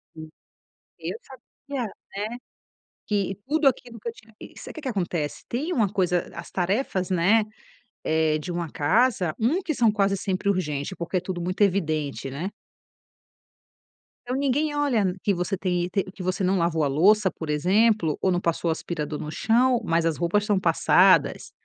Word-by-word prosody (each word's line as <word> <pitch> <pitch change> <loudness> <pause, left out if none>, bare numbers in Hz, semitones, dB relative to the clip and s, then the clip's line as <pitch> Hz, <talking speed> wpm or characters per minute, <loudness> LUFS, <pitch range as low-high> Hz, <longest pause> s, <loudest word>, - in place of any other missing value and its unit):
Hum. 155 0 -9 0.7
Eu - - -4
sabia, 265 - -7 0.3
né. 215 +4 -3 0.7
Que 195 -2 -1
tudo 300 -2 +4
aquilo 240 -3 -4
que 235 - -5
eu - - -3
tinha 225 -1 -19
que - - -12
sabe - - -9
que 315 - -7
que 270 - -3
acontece, 175 -9 -2
tem 295 +9 -2
uma 220 - +2
coisa, 180 -3 +1
as - - -8
tarefas, 190 0 -1
né, 195 +5 +3 0.6
eh, 160 -1 +2
de 165 +4 -5
uma 170 -2 -3
casa. 185 - +2
Um 290 - +1
que 310 - -2
são 235 -3 +4
quase 200 -1 +1
sempre 195 +1 -2
urgente, 150 -3 -2
porque 170 +1 -2
tudo 180 -1 -5
muito 185 +4 -1
evidente, 155 -8 0
né. 165 +9 -4 1.8
Então 250 +1 -2
ninguém 285 +2 0
olha 230 -11 +1
que 200 - +2
você 180 +2 -2
tem 180 -2 0
te 195 +2 0
que 190 - -10
você 185 +1 -1
não 190 +1 +2
lavou 165 -2 +1
a - - +2
louça, 190 +7 +4
por 160 -2 -7
exemplo, 185 +2 +2
ou 185 - +2
não 175 - +1
passou 170 -1 -1
o - - +3
aspirador 155 -2 -4
no 150 - -5
chão, 240 - +2
mas 165 -3 +1
as 165 - +1
roupas 190 +5 +1
são 205 -3 +2
passadas, - - +4
190 Hz, 175 wpm, -25 LUFS, 170-225 Hz, 1.8 s, tudo